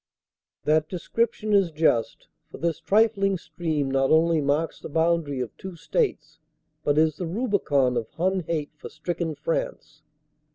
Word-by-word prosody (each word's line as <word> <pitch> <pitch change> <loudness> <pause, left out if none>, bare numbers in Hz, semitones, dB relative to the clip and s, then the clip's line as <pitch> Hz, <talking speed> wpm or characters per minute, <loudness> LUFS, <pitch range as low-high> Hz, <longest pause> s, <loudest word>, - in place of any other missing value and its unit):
That 155 +2 +2
description 215 +3 -1
is 195 -3 +4
just, 150 -7 +1 0.2
for - - -10
this 170 -1 -1
trifling 200 -2 +2
stream 155 -5 -2
not 135 0 +2
only 160 0 +4
marks 145 +3 0
the - - -8
boundary 160 -3 +1
of 120 -4 -5
two 190 -2 -8
states 165 - -2 0.4
but 145 0 +1
is 155 -1 +3
the 180 - -3
rubicon 165 - +1
of 115 -2 -2
Hun 185 +3 0
hate 155 -3 -3
for 150 - -9
stricken 165 0 -3
France. - - -4
165 Hz, 150 wpm, -25 LUFS, 150-190 Hz, 0.4 s, is